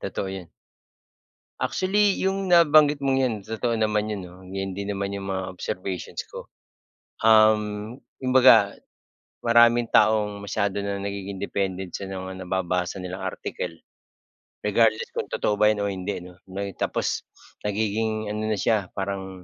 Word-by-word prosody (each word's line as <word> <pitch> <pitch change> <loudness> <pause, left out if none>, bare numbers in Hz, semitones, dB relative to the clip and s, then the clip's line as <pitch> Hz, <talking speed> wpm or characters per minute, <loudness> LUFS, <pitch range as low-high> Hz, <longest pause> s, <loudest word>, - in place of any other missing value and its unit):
Totoo 95 - -4
yan. 95 -3 -7 1.1
Actually 200 +1 +2
yung 195 0 -1
nabanggit 150 -4 +5
mong 135 -1 +2
'yan 125 -4 +1
totoo 115 +2 -1
naman 105 -1 +1
'yon 105 -2 -3
'no, 90 +1 -13
yun 95 0 -4
din 100 +1 -4
naman 100 0 -3
'yong 100 0 -5
mga 95 -1 -2
observations 90 0 -5
ko. - - -10 0.8
Um, 110 0 +4 0.2
kumbaga, 125 -5 +6 0.7
maraming 120 0 +5
taong 105 -2 +3
masyado 100 0 -1
na 100 0 -3
nagiging 100 0 -5
dependent 95 -1 -3
sa 100 - -5
mga 95 0 -6
nababasa 90 0 -1
nilang 90 +1 -5
article. - - -5 0.9
Regardless 475 0 +2
kung 465 -1 -3
totoo 105 -1 -1
ba 105 - +6
'yan 105 -1 +2
o 100 - 0
hindi 95 -1 -4
'no. 90 0 -14
May 100 +1 -4
tapos - - -2 0.4
nagiging 110 +1 -1
ano 110 0 -2
na 110 - +1
siya, 105 -2 +1
parang 95 -2 -4
100 Hz, 140 wpm, -25 LUFS, 95-115 Hz, 1.1 s, kumbaga